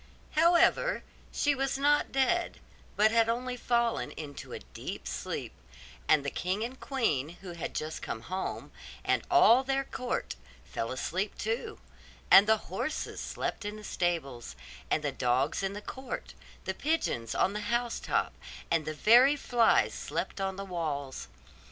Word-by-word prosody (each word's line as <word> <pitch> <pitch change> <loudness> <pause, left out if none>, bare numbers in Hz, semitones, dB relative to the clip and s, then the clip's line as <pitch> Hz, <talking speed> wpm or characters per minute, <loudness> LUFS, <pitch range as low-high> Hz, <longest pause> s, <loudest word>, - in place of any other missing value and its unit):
However, 345 +9 +4 0.3
she 290 - +2
was 270 0 -1
not 290 +1 +3
dead, 305 +7 +1 0.4
but 215 +1 +4
had 230 0 +4
only 250 +2 -1
fallen 235 -1 0
into 145 -3 -8
a - - -4
deep 60 - -7
sleep; 65 +1 -4 0.5
and 150 -2 +4
the 140 - -1
king 185 +4 -1
and 240 +2 -4
the 260 - -19
queen, 190 - 0
who 185 - -6
had 170 -2 -5
just 155 +1 -3
come 110 - -4
home, 185 +10 -4 0.3
and - - +2
all 345 -8 +6
their 270 0 0
court, 250 -2 -3 0.3
fell 115 - -4
asleep 185 +10 -2
too; 230 - -3 0.5
and 200 +2 +9
the 220 0 +5 0.2
horses 305 +11 -3
slept - - -3
in 205 +1 -4
the 215 - -10
stables, 140 - -2 0.3
and - - +1
the - - 0
dogs 130 +5 +1
in 195 0 -1
the 205 - -6
court, 260 +2 -6 0.3
the 190 - -1
pigeons 230 - -1
on 195 - +2
the 210 - -2
house 240 0 0
top, - - 0 0.4
and 165 -2 +2
the 155 - -4
very 245 - +6
flies 240 -5 +3
slept - - -4
upon 195 0 -1
the 195 +1 -5
walls. 145 - -4
210 Hz, 160 wpm, -30 LUFS, 160-260 Hz, 0.5 s, and